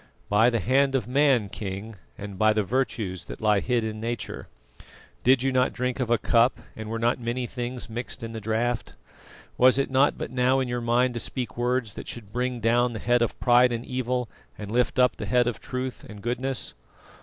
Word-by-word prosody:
"By 110 +4 +5
the 115 -2 0
hand 135 +3 +2
of 120 -5 0
man, 135 -4 +3
King, 100 +2 -6 0.2
and 100 -2 -8
by 110 0 +5
the 105 0 +1
virtues 100 -6 -2
that - - -8
lie 105 -2 +3
hid 120 +1 0
in 110 -1 -4
Nature. 120 +1 -4 0.8
Did 130 0 +4
you 135 - +2
not 130 0 +2
drink 125 +1 -2
of 125 -3 -1
a 120 - +4
cup, 115 +3 +3 0.2
and 110 0 -7
were 115 - -2
not 120 +2 +1
many 120 +1 -2
things 125 0 -5
mixed 120 +1 -6
in 115 - -5
the 110 -1 -6
draught? 110 +2 -1 0.6
Was 130 +1 +6
it 135 -1 0
not 135 +2 +3
but - - -5
now 130 +1 +2
in 130 - -1
your 120 0 -2
mind 120 +2 +2
to 120 - -3
speak 120 -2 -4
words 120 -2 -1
that - - -8
should 105 -4 -8
bring 125 0 -1
down 120 +2 +2
the - - -4
head 120 0 +2
of 120 - -1
pride 125 0 +5
and 120 0 -3
evil, 125 -1 -2 0.3
and 105 -1 -7
lift 125 +2 +1
up 125 -1 +3
the - - -5
head 125 -1 +3
of 120 -2 -2
truth 130 0 -5
and 105 -2 -10
goodness?" 125 +2 -2
120 Hz, 210 wpm, -26 LUFS, 110-125 Hz, 0.8 s, Was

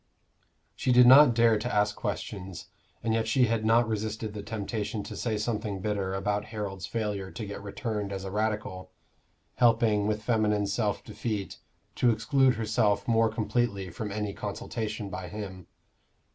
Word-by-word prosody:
She 130 - 0
did 125 0 +7
not 130 0 +8
dare 115 -2 +4
to 120 +3 -3
ask 105 0 +2
questions, 95 -3 -5 0.3
and 115 0 +1
yet 115 0 0
she 125 +2 +4
had 115 -1 0
not 115 +1 +4
resisted 110 0 -3
the 105 - -5
temptation 105 0 -4
to - - -8
say 110 -3 -1
something 105 -2 -2
bitter 95 -1 -2
about 105 +1 -1
Harold's 100 -4 -5
failure 105 -4 -3
to 110 - -6
get 100 0 -7
returned 105 0 -4
as 95 -1 -4
a 95 - -5
Radical, 105 -3 -2 0.7
helping, 115 -3 +3
with 105 0 -1
feminine 105 -3 +1
self 105 +1 -1
defeat, 105 -5 -4 0.4
to 125 - +4
exclude 130 +4 +3
herself 105 -2 +1
more 115 -1 +3
completely 110 -3 -1
from 105 +5 -5
any 105 -1 -3
consultation 110 -2 -4
by 90 0 -5
him. 95 -4 -7
105 Hz, 160 wpm, -28 LUFS, 100-115 Hz, 0.7 s, not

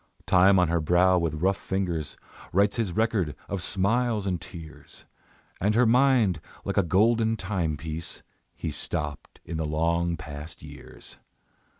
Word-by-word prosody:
Time 95 +2 +5
on 90 -1 +4
her 85 0 +1
brow 90 +3 +4
with 80 -1 -2
rough 95 +1 +2
fingers 90 -6 -3 0.3
Writes 100 +4 +2
his 110 -6 0
record 105 - 0
of 100 -3 -3
smiles 110 +3 +1
and 90 -4 -1
tears; 80 -2 -11 0.5
And 105 +3 +1
her 125 +2 +5
mind, 120 - +3 0.2
like - - -3
a - - +6
golden 110 +5 +2
timepiece, 85 -4 -3 0.3
He 80 - -4
stopped 75 0 -5
in 80 - -4
the 80 - -1
long 85 +2 0
past 75 0 -9
years. - - -10
90 Hz, 140 wpm, -26 LUFS, 80-105 Hz, 0.5 s, a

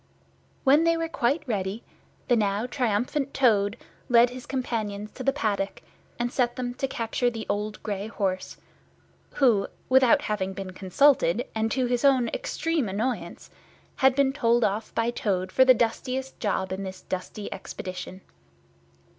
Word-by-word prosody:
When 290 +4 +5
they 335 0 +3
were 330 0 -1
quite 290 +1 0
ready, 200 0 -2 0.4
the 245 - +4
now 210 0 +1
triumphant 250 +3 -1
Toad 210 -6 +3 0.3
led 240 0 +6
his 255 0 -9
companions 215 -5 -3
to - - -10
the 275 - +3
paddock 205 -7 -2 0.3
and 240 +1 -2
set 240 -2 +1
them 245 -1 -3
to 270 - -2
capture 240 0 -1
the 225 -2 -6
old 210 +1 -3
grey 205 -1 -3
horse, 190 -4 -3 0.8
who, 230 -8 +3 0.2
without 255 -2 +5
having 195 -3 -2
been 190 -1 -6
consulted, 220 +2 +3
and 220 0 0
to 260 -1 +1
his 245 +1 0
own 265 -4 +4
extreme 330 - -1
annoyance, 225 +6 -3 0.5
had 265 -1 +4
been 275 -1 +3
told 240 -4 +2
off 210 +2 -1
by 230 +1 +1
Toad 190 -5 -1
for 260 - +5
the 260 -1 +7
dustiest 255 +3 -2
job 190 -3 -1
in 190 +1 -3
this 190 -1 -7
dusty 185 +3 -5
expedition. 185 0 -7
235 Hz, 155 wpm, -26 LUFS, 205-260 Hz, 0.8 s, the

